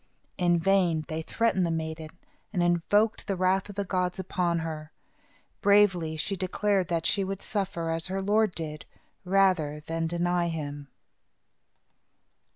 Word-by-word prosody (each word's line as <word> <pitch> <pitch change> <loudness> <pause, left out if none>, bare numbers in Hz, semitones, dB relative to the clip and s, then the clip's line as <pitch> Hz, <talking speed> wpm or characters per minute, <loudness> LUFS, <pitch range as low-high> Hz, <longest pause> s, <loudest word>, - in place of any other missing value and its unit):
In 175 -1 +3
vain 170 -3 +2
they 160 0 -2
threatened 210 +2 +1
the 170 - +1
maiden, 160 -1 -3 0.4
and 180 -4 0
invoked 190 +6 +2
the 195 - 0
wrath 185 +2 +1
of 205 - -8
the 200 - -1
gods 180 -1 -1
upon 180 -2 -1
her. 155 -1 -6 0.7
Bravely 190 -6 +4
she 195 +5 -1
declared 190 0 0
that 165 -1 -1
she 200 - +3
would 195 0 -4
suffer, 185 -5 -2
as 165 0 -1
her 190 +1 -2
Lord 210 0 +2
did, 155 -2 -5 0.4
rather 180 -6 +2
than 165 0 -2
deny 175 +1 0
him. 145 -3 -5
175 Hz, 145 wpm, -28 LUFS, 165-195 Hz, 0.7 s, Bravely